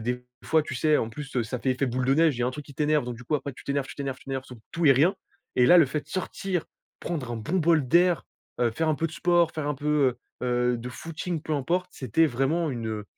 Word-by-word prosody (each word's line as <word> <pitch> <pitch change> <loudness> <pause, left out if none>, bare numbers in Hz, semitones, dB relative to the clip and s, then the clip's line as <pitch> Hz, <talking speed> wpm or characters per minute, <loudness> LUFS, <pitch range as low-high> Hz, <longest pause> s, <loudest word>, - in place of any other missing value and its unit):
Des 125 +2 -3 0.2
fois, 160 -1 +3
tu 130 -3 -5
sais 155 +3 +3
en 110 - -1
plus, 140 +4 -8
heu, 125 - +2
ça 115 +3 -4
fait 130 - 0
effet 130 +2 0
boule 125 +1 -1
de 135 +2 +3
neige, 160 -3 +3
il - - -5
y - - +2
a - - +1
un - - 0
truc 150 +3 -7
qui 140 - -13
t'énerve, 150 0 +2
donc 120 -1 -5
du 125 - -12
coup 150 - -1
après, 140 -1 -2
tu - - -13
t'énerves 140 -1 -1
tu - - -9
t'énerves 135 -2 -4
tu - - -19
t'énerves 135 -1 -3
sur 125 - -11
tout 170 -1 0
et 140 - +9
rien. 160 +10 +3 0.4
Et 125 - +5
là, 180 - +8
le 160 - +6
fait 150 +3 -2
de - - -23
sortir, 185 -2 -3 0.4
prendre 145 -9 -3
un - - -3
bon 135 - -2
bol 160 -4 +3
d'air, 175 +4 +4 0.4
heu, 120 -1 +3
faire 160 +8 -1
un 155 - +3
peu 165 +3 -1
de 160 - -13
sport, 175 0 +3
faire 155 -2 -4
un 150 - 0
peu 145 +2 -7 0.3
heu 120 - -31 0.3
heu 125 0 +1
de 120 +1 -6
footing, 165 +5 -5
peu 155 - -4
importe, 175 +6 0
c'était 135 +6 +2
vraiment 150 +5 0
une, 115 -4 -4
heu, 105 -1 -4
140 Hz, 290 wpm, -26 LUFS, 125-160 Hz, 0.4 s, et